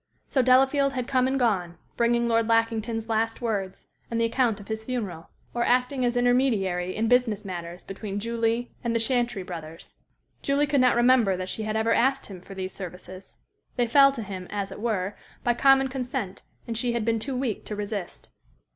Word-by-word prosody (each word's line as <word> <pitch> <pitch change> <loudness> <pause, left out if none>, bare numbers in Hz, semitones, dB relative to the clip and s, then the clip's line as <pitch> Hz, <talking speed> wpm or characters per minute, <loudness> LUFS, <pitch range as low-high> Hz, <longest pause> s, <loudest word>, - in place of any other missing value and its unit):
So 265 - +2
Delafield 270 +2 +4
had 255 -2 -3
come 255 -1 +2
and 265 +1 0
gone, 190 -9 0 0.2
bringing 235 0 +2
Lord 230 -1 +2
Lackington's 225 0 0
last 225 0 0
words, 200 -5 -3 0.2
and 230 - -1
the 230 - +3
account 230 -2 +1
of 205 - -12
his 220 0 -4
funeral, 205 -10 -4 0.2
or 240 - 0
acting 250 +2 +1
as 245 0 +1
intermediary 215 -8 +1
in 225 +1 0
business 225 -4 +2
matters 175 -1 -6
between 200 +1 -5
Julie 230 +2 -1
and 235 -1 -1
the - - +3
Chantrey 240 -3 0
brothers. 165 -2 -9 0.5
Julie 280 +1 +2
could 285 -2 +2
not 250 -1 +4
remember 240 -5 +4
that 185 0 -4
she - - -4
had 215 0 -2
ever 225 +1 +2
asked 270 +2 +2
him 185 -3 -10
for 195 +2 -11
these 185 0 -5
services. 185 0 -10 0.4
They 245 - +2
fell 275 +4 +6
to 235 -5 -5
him, 190 -3 -7
as 200 -1 -3
it - - -8
were, 205 -4 -1 0.3
by 240 - +3
common 270 +2 +5
consent, 250 -7 -4 0.2
and 230 - -4
she 240 +1 0
had 235 -2 -1
been 230 -1 +1
too 260 +4 -3
weak 250 -5 -2
to 210 - -5
resist. 205 -3 -5
230 Hz, 195 wpm, -26 LUFS, 195-250 Hz, 0.5 s, fell